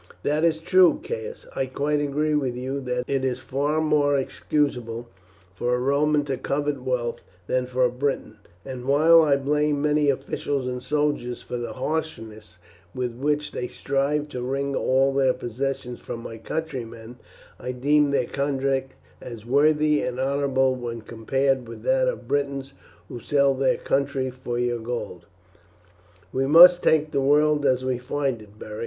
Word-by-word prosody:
"That 150 +2 0
is 165 -1 +3
true, 180 +1 +4
Caius. 470 0 -6
I 135 - -1
quite 145 +3 -1
agree 150 +2 0
with 135 -5 0
you 130 +2 -3
that 125 0 -1
it 135 -1 -1
is 130 -2 0
far 140 +4 -1
more 150 -2 +2
excusable 125 -4 -2 0.5
for 120 +7 0
a - - -1
Roman 145 +3 +2
to 135 -2 -2
covet 145 +1 -2
wealth 125 -2 -2 0.2
than 125 +5 0
for 125 0 +1
a 125 - +1
Briton; 125 -4 -3 0.3
and 130 -2 -7
while 160 +4 +6
I 150 -3 +4
blame 145 +1 0
many 150 0 +2
officials 140 0 -2
and 125 0 -3
soldiers 145 -3 -1
for 125 - -5
the 120 -2 -5
harshness 115 - -5 0.4
with 125 -2 -2
which 150 +4 -1
they 125 - -4
strive 140 +3 -1
to 125 -4 -5
wring 140 +2 -2
all 135 +1 +2
their 135 -2 +3
possessions 125 0 -4
from 115 - -6
my 115 -1 -8
countrymen, 120 -5 -6 0.4
I 125 - -4
deem 145 +3 +2
their 140 - +1
conduct 135 -1 -1 0.3
as 115 -3 -9
worthy 150 +3 +3
and 125 0 -3
honourable 135 -1 +1
when 120 -2 -5
compared 130 +3 -1
with 115 - -10
that - - +2
of - - -3
Britons 140 -1 -2 0.3
who 120 - -7
sell 140 +3 +2
their 135 0 +1
country 135 -1 -1
for 125 -1 -5
your 120 -1 0
gold." 110 -7 -5 1.1
"We 135 +1 0
must 175 +4 +9
take 155 -1 +2
the 140 - +1
world 150 +1 +3
as 130 0 +1
we 130 -2 -1
find 130 -2 -2
it, 105 0 -16
Beric. 105 0 -8
135 Hz, 165 wpm, -24 LUFS, 125-145 Hz, 1.1 s, must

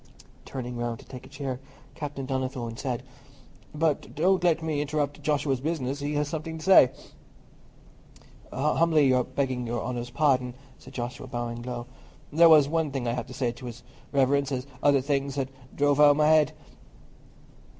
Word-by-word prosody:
Turning 125 -2 -5
round 120 -1 -2
to - - -15
take 125 -1 -10
a - - -18
chair, 135 -3 -4 0.3
Captain 140 -3 -5
Donnithorne 130 -3 -3
said, 125 0 -3 0.7
"But 155 -1 -1
don't 180 +3 +2
let 165 -2 +2
me 155 -2 -1
interrupt 145 0 -2
Joshua's 140 -3 0
business—he 145 -1 -2
has 145 0 0
something 160 +1 -5
to 155 - -9
say." 185 -9 +7 1.6
"Humbly 150 0 +3 0.2
begging 130 -3 -1
Your 120 -1 -2
Honour's 120 -1 -4
pardon," 130 -4 +1 0.2
said - - -14
Joshua, 125 +1 -5
bowing 120 -1 -4
low, 120 -1 -5 0.5
"there 165 +2 +7
was 150 -3 +7
one 160 0 0
thing 135 -3 -3
I 115 - 0
had 120 -2 -4
to - - -10
say 125 -4 0
to 120 +2 -10
His 120 0 -9 0.3
Reverence 140 0 +2
as 130 -1 -2 0.2
other 140 -2 +4
things 140 0 -1
had 135 -1 -2 0.2
drove 145 0 +2
out 150 0 +8
o' - - +7
my 150 +1 +3
head." 155 -1 +4
140 Hz, 165 wpm, -27 LUFS, 125-150 Hz, 1.6 s, out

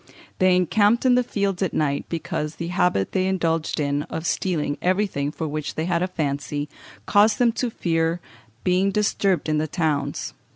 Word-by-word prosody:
They 185 -1 +5
encamped 205 +6 +3
in 255 - +5
the 250 - +4
fields 200 -5 -2
at 190 - -1
night, 140 -2 0
because 155 -2 -3
the 170 0 -5
habit 180 - +1
they 185 0 +1
indulged 165 -4 0
in 145 -1 0
of 160 - -4
stealing 160 -6 -1
everything 185 -6 0
for 160 +1 -4
which 150 0 -4
they 160 - -1
had 170 -1 0
a 180 - +1
fancy, 145 -3 -3 0.4
caused 210 +1 +4
them 240 -2 +4
to 250 - 0
fear 165 -4 0 0.4
being 185 +2 +2
disturbed 200 -3 +1
in 155 -1 +1
the 155 - -1
towns. 150 -3 -1
170 Hz, 175 wpm, -23 LUFS, 150-190 Hz, 0.4 s, They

